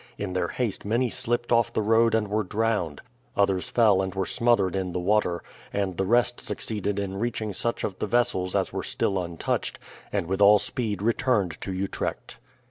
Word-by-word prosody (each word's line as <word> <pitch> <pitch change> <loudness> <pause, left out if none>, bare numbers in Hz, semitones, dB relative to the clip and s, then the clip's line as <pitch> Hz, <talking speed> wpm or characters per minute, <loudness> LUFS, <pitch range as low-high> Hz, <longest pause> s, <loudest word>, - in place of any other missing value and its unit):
In 100 -3 -4
their 90 -2 0
haste 115 +1 -2
many 115 +3 +1
slipped 120 -1 -2
off 115 -1 +3
the 110 - 0
road 115 +1 +4
and 110 -2 +1
were 105 +2 0
drowned, 105 -6 -1 0.4
others 95 -2 +2
fell 105 -5 +4
and 95 0 -3
were 95 -1 0
smothered 115 -6 +2
in 95 -2 -2
the 90 - -1
water, 90 -2 +1 0.3
and 100 -3 -1
the 95 +2 -1
rest 120 +2 +3
succeeded 105 -2 -3
in 100 -1 -3
reaching 110 -2 -2
such 115 +5 -2
of 95 -3 -3
the - - -1
vessels 95 -5 +1
as - - 0
were - - -2
still 95 -2 0
untouched, 85 -1 -2 0.3
and - - -1
with 95 +3 -2
all 105 +1 +8
speed 105 -3 -2
returned 110 - +1
to 95 - -4
Utrecht. 95 +1 -4
100 Hz, 190 wpm, -26 LUFS, 95-115 Hz, 0.4 s, all